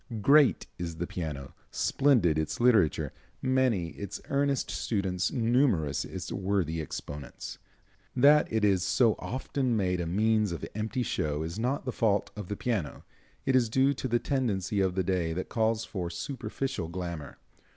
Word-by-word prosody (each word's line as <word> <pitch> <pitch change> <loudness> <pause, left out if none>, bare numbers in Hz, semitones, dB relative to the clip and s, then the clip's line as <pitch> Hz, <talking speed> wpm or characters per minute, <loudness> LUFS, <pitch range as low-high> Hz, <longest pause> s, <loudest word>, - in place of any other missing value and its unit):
Great 145 +1 +5
is 85 -2 -4
the 85 +2 -3
piano, 75 -6 -5 0.2
splendid 110 - +2
its 80 - -2
literature, 115 -10 +3 0.3
many 130 -9 +1
its 100 +3 -7
earnest 140 -1 +1
students, 95 -4 -1
numerous 115 - +2
its 95 -1 -6
worthy 95 -5 -1
exponents. 75 -1 -7 0.6
That 145 +4 +5
it 110 -1 +2
is 95 -3 +3
so 115 +2 +3
often 130 -1 -1
made 90 -3 0
a 85 - -3
means 105 +2 +2
of 85 - -4
empty 110 +4 -2
show 75 -8 -1
is 85 +6 -5
not 125 +5 -1
the 130 - -1
fault 105 -4 +1
of 105 -3 -6
the 105 - -4
piano, 105 -12 -2 0.4
it 135 -1 +2
is 120 -3 +3
due 135 +4 +3
to 125 -3 -2
a - - +6
tendency 110 -7 0
of 95 -1 +1
the 95 - +1
day 85 -3 0
that 90 +3 -4
calls 110 -1 +1
for 90 -5 -4
superficial 125 - -4
glamor. 85 -3 -6
105 Hz, 160 wpm, -29 LUFS, 85-125 Hz, 0.6 s, a